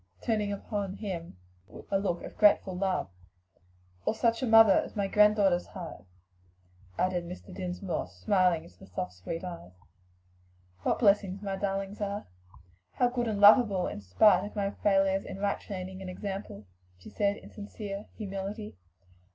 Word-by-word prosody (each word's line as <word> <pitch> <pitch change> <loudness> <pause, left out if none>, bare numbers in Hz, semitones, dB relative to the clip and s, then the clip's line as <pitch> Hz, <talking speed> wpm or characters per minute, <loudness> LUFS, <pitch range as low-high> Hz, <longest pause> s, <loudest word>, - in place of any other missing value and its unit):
turning 215 -3 0
upon 200 -1 -4
him 170 - -6 0.5
a 195 - +3
look 180 -3 -2
of - - -9
grateful 200 -2 +4
love. 185 - -1 1.0
"Or - - 0
such 230 +2 +1
a 260 - 0
mother 225 -3 +8
as - - -6
my 200 -2 0
granddaughters 205 -3 +4
have," 175 - -8 0.9
added 180 -1 0
Mr. 180 +2 -9
Dinsmore, 180 - -3
smiling 170 - +1
into 90 0 -18
the - - -13
soft, 90 -1 -4
sweet 165 - -6
eyes. 170 - -8 1.1
"What - - +1
blessings 200 -3 +2
my 195 -1 -2
darlings 195 +1 -3
are! 205 0 -3 0.7
how 245 - +2
good 245 -1 -2
and 210 -2 -1
lovable 205 -3 +6
in - - -5
spite 100 - +4
of 205 - -7
my 200 -1 -1
failures 195 -1 +2
in - - -7
right 200 0 -1
training 190 -1 -7
and 190 - -6
example," 190 - -6 0.3
she 90 - -13
said 205 -1 0
in - - -13
sincere 205 -1 -7
humility. 205 +1 -5
195 Hz, 150 wpm, -29 LUFS, 180-205 Hz, 1.1 s, mother